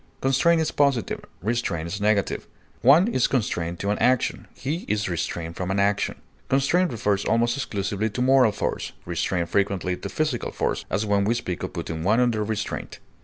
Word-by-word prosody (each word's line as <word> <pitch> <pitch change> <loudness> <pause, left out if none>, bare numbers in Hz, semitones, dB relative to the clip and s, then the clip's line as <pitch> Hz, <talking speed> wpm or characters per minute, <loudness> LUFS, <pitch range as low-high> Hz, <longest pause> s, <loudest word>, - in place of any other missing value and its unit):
Constrain 135 +6 +3
is 160 - 0
positive; 140 -6 +1 0.2
restrain 105 -7 -1
is 100 +4 -5
negative; 105 -2 +1 0.3
one 150 - +6
is 130 - +2
constrained 90 -9 -1
to 100 +3 -1
an 105 - -1
action; 125 -1 +1
he 145 +5 -2
is 105 0 0
restrained 85 -1 -3
from 90 0 -3
an 95 +1 0
action. 100 0 +1 0.3
Constrain 140 +7 +3
refers 105 - 0
almost 115 +2 +2
exclusively 105 -4 -2
to 110 - -6
moral 130 -2 +5
force, 105 - -3
restrain 85 +1 -1
frequently 95 0 0
to - - -7
physical 150 -6 -1
force, - - -2
as 105 - 0
when 100 -1 +2
we 110 +4 +1
speak 90 -6 -4
of - - -4
putting 80 -1 -4
one 105 +7 +3
under 120 -4 +2
restraint. 105 -1 -4
105 Hz, 175 wpm, -24 LUFS, 95-125 Hz, 0.3 s, one